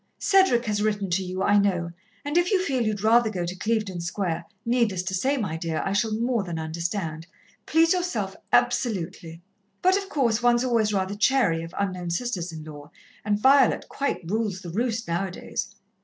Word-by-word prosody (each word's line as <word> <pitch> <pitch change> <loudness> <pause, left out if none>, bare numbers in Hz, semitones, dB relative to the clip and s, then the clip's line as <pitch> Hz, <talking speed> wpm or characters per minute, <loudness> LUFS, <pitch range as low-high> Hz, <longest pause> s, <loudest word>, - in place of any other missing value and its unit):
"Cedric 380 -12 +3
has 210 -2 -1
written 205 -3 -1
to 185 +3 +2
you, 185 +1 -3
I 205 +1 +4
know, 180 -4 0 0.3
and 290 +2 -3
if 350 +1 +3
you 390 - +4
feel 275 -9 0
you'd 215 -3 -1
rather 230 +1 +4
go 180 -4 -3
to 175 +2 -4
Clevedon 210 -3 -1
Square, 170 -1 -2 0.2
needless 230 -6 +1
to 185 - -4
say, 265 +10 +1
my 190 -10 -2
dear, 160 -1 -2
I 195 - -1
shall 220 +2 +1
more 235 0 0
than 175 -4 -5
understand. 165 0 -4 0.4
Please 330 +2 +4
yourself 360 0 -2 0.2
absolutely. 175 -6 0 0.4
"But, 375 +1 +5
of 395 -1 -5
course, 235 - +1
one's 240 0 +3
always 230 -4 +2
rather 195 -1 -1
chary 210 -6 +2
of 165 0 -9
unknown 185 -3 -2
sisters 180 -2 -2
in 160 -1 -8
law, 145 -1 -10 0.3
and 205 -1 +1
Violet 270 +5 +4
quite 275 -11 -2
rules 205 -1 -1
the 175 - -6
roost 230 +3 -1
now 170 +3 -1
a - - -7
days. 180 - -5
205 Hz, 190 wpm, -25 LUFS, 175-240 Hz, 0.4 s, But